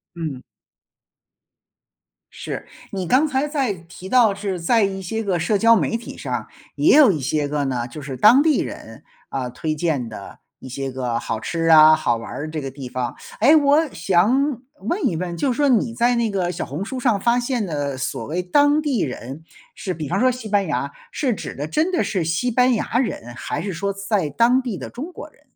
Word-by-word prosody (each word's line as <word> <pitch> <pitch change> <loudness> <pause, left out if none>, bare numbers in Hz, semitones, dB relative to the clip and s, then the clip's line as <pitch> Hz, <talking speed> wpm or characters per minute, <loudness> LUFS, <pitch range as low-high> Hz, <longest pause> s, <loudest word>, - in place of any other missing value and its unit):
嗯。 155 -7 -5 1.9
是， - - -6 0.3
你 190 -3 -3
刚 275 - +3
才 270 +1 0
在 275 -8 -1
提 170 +1 -12
到 230 -3 +4
是 195 -2 -3
在 215 +7 +2
一 195 -1 -3
些 220 +5 -3
个 190 -4 0
社 185 +5 +1
交 230 +2 +6
媒 230 - 0
体 235 - -10
上 - - -4 0.3
也 - - +5
有 285 -10 +7
一 155 - -3
些 145 +3 0
个 145 -1 -1
呢， 125 -3 -2
就 125 +5 -9
是 135 -2 -6
当 240 - +6
地 310 -2 +3
人， - - -7 0.2
啊， 130 -2 -3
推 155 +5 -3
荐 150 -6 -1
的 110 -3 -10 0.2
一 - - -12
些 135 +1 -4
个 125 -2 -2
好 115 - -3
吃 165 +9 -3
啊， 155 -1 +8
好 120 -6 0
玩 115 +4 -7
的 155 - -4
这 155 -1 -4
个 135 - -4
地 130 -1 -8
方。 125 0 -3 0.3
诶， 280 +8 +6
我 295 +1 +4
想 225 - +1 0.2
问 345 - -1
一 - - +1
问， 175 0 -4
就 255 +10 0
说 285 +3 +2
你 230 -1 +2
在 240 +1 +2
那 235 -2 0
个 185 -3 -1
小 180 - -4
红 145 +7 -5
书 255 +6 -5
上 235 -5 +1
发 235 +4 +2
现 240 -4 -1
的 145 -4 -3
所 135 - -3
谓 175 +4 -2
当 290 +10 +3
地 280 -7 -1
人， 135 +3 -6 0.3
是 185 - -4
比 155 -3 -5
方 190 - 0
说 255 +1 +4
西 250 -3 -6
班 200 -2 +1
牙， 140 -2 -2 0.2
是 260 -5 -1
指 - - -7
的 145 +2 -4
真 315 - 0
的 350 - +2
是 185 -5 -1
西 165 +10 0
班 250 +2 +3
牙 230 0 -1
人， 120 - -3
还 145 - -4
是 190 +2 -4
说 200 +4 -2
在 200 -5 -1
当 240 - +3
地 235 -7 -4
的 - - -7
中 300 +9 -7
国 - - -9
人？ - - -28
190 Hz, 230 characters per minute, -21 LUFS, 150-245 Hz, 1.9 s, 啊